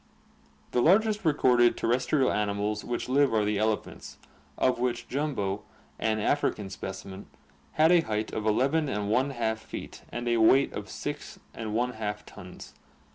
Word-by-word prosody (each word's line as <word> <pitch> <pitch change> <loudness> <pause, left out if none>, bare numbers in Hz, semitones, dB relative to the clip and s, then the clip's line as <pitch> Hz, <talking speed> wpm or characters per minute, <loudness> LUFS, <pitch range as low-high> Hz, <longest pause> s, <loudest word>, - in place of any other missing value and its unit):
The 125 - +2
largest 210 - +3
recorded 125 -6 +4
ter - - -2
restrial 130 +3 +2
animals 105 0 -1
which 120 - -3
live 135 -2 +3
are 105 -1 +2
the 105 -1 0
elephants, 110 0 -2 0.4
of 130 -2 +2
which 120 -1 -1
"Jumbo," 125 -9 -2 0.4
an 110 -1 +1
African 105 -5 0
specimen, 95 +1 -7 0.5
had 160 +2 +4
a 175 -1 +6
height 110 -6 -3
of 110 - -3
n}4 120 -2 +1
feet - - -8
and 120 0 -5
a 120 0 +2
weight 130 +5 +4
of - - -5
6}4 110 -1 -4
tons. - - -11
120 Hz, 130 wpm, -28 LUFS, 105-135 Hz, 0.5 s, a